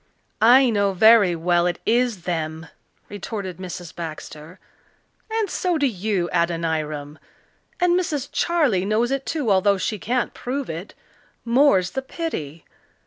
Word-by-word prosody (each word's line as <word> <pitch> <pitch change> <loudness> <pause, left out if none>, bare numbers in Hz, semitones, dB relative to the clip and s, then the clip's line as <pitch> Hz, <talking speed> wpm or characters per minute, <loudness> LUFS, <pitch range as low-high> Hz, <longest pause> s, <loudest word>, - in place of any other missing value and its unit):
"I 245 +3 +6
know 200 -2 +1
very 205 -2 +6
well 175 +1 +1
it 175 - -1
is 235 -5 +1
them," 160 -2 -3 0.4
retorted 200 -3 -6
Mrs. 180 -2 -8
Baxter, 160 0 -8 0.7
"and 445 -1 0
so 360 -2 -1
do 290 - +1
you, 200 -6 -1
Adoniram. 160 -3 -2 0.6
And 355 0 +3
Mrs. 295 -6 -2
Charley 295 - +1
knows 220 +5 +1
it 275 0 -2
too, 285 -9 -1
although 195 +1 +3
she 210 +2 -3
can't 245 +5 -1
prove 260 -3 -4
it 165 +5 -8 0.5
more's 235 -7 +3
the 265 - -3
pity! 170 - -6
200 Hz, 135 wpm, -22 LUFS, 170-255 Hz, 0.7 s, I